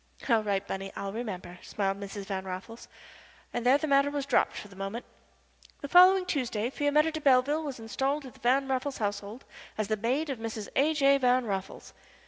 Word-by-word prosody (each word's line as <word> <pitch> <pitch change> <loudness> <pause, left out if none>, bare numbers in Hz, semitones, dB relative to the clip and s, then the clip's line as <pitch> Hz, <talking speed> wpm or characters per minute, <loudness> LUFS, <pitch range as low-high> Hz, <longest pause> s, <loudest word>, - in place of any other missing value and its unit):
"All 230 -4 +4
right, 200 -2 -1
Bunny, 195 0 -5
I'll 195 0 -5
remember," 185 -6 -6
smiled 195 -1 -2
Mrs. 200 0 -7
Van 195 -1 -4
Raffles, 190 +5 -8 0.7
and 240 - -2
there 255 +3 +5
the 310 - -3
matter 280 -1 +3
was 285 -1 -3
dropped 280 - +2
for - - -7
the 195 - -16
moment. 195 +5 -5 0.8
The 285 - -5
following 365 +3 +7
Tuesday 250 -8 -2
Fiametta 300 +3 +2
de 315 0 -5
Belleville 280 +3 +3
was 280 -5 -5
installed 270 +6 -2
in 260 - -9
the - - -20
Van 265 +3 +2
Raffles 265 +1 -2
household 205 +2 -4 0.3
as 215 -1 -2
the 215 - +1
maid 265 +8 -1
of 255 - -5
Mrs. 225 -2 -5
A. 305 +3 +3
J. 275 -1 +4
Van 250 -1 +3
Raffles. 195 -2 -5
245 Hz, 195 wpm, -29 LUFS, 205-280 Hz, 0.8 s, following